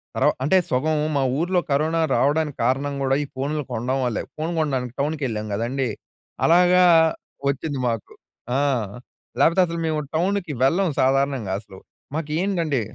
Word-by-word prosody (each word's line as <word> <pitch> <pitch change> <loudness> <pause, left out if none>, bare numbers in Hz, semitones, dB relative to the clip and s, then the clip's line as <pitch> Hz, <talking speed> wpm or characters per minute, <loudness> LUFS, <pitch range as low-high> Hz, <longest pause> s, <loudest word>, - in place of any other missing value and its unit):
తర్వ - - +3
అంటే 185 +7 +4
సగం 155 +5 +1 0.2
మా 135 - +2 0.2
ఊర్లో 180 +2 +1
కరోనా 155 +4 +1 0.2
రావడానికి 150 0 +1
కారణం 140 +3 0
కూడా 135 0 +2
ఈ - - -5
ఫోన్‌లు 145 +3 -2
కొనడం 130 +4 -1
వల్లే. 120 -4 -1
ఫోన్ 160 +2 -2
కొనడానికి 130 -5 -1
టౌన్‍కి 150 0 -2
వెళ్ళాం 110 -2 -4
కదండీ! 125 +3 -1 0.6
అలాగా 180 +2 +5 0.7
వచ్చింది 140 0 -2
మాకు. 115 -3 -4 0.4
ఆ! - - +2 0.8
లేపోతే 170 +3 +4
అసలు 170 -1 -4
మేము 155 -1 0 0.2
టౌన్‌కి 180 -1 0
వెళ్ళం 175 +8 +3
సాధారణంగా 135 -5 +1
అసలు. 100 -2 -14 0.4
మాకెంటండి 160 -2 -1
145 Hz, 140 wpm, -23 LUFS, 130-165 Hz, 0.8 s, అలాగా